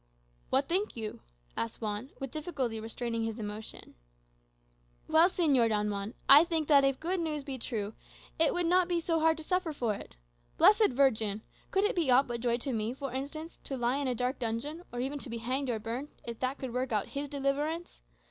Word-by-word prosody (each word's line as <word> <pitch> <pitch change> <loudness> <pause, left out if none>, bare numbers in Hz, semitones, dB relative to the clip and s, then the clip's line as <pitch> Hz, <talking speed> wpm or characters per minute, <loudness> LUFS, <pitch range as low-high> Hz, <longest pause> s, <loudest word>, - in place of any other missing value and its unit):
"What 270 +1 +2
think 380 - 0
you?" 220 -2 -5 0.3
asked 230 -1 -3
Juan, 215 +3 -3
with 270 -2 -5
difficulty 275 -8 -2
restraining 230 +1 -3
his 225 0 -2
emotion. 215 0 -7 1.1
"Well, 330 +3 +6
Señor 285 -11 +3
Don 210 -1 +1
Juan, 200 +3 -4
I 285 +3 +10
think 325 -3 -1
that 280 -2 +7
if 275 -1 +3
that - - -30
good 370 +1 +1
news 305 -3 -2
be 270 -2 -5
true, 215 -2 -3 0.5
it 320 -2 +5
would 355 -1 0
not 360 +1 +4
be 350 -1 +1
so 330 0 0
hard 320 0 +3
to 320 - -7
suffer 365 0 0
for 235 -6 0
it. 200 - -10 0.4
Blessed 425 0 +6
Virgin! 225 -6 +2 0.3
Could 390 - +2
it 425 +4 +1
be 335 -6 +1
aught 255 +2 +6
but 235 -1 -4
joy 240 -1 +1
to 260 +2 -3
me, 225 +2 -1
for 275 -2 -5
instance, 300 +5 -5
to 270 - -4
lie 245 +2 +1
in 285 -1 -1
a 250 - 0
dark 250 +3 -1
dungeon, 250 +8 -3
or 245 - -5
even 280 +3 -2
to 270 - -4
be 235 - -4
hanged 255 +4 -2
or 235 - 0
burned, 235 +6 -4
if 235 -1 -6
that 260 +2 -1
could 260 -3 -5
work 255 0 -1
out 210 -2 0
his 285 0 -4
deliverance? 290 +4 -2
265 Hz, 215 wpm, -31 LUFS, 230-310 Hz, 1.1 s, I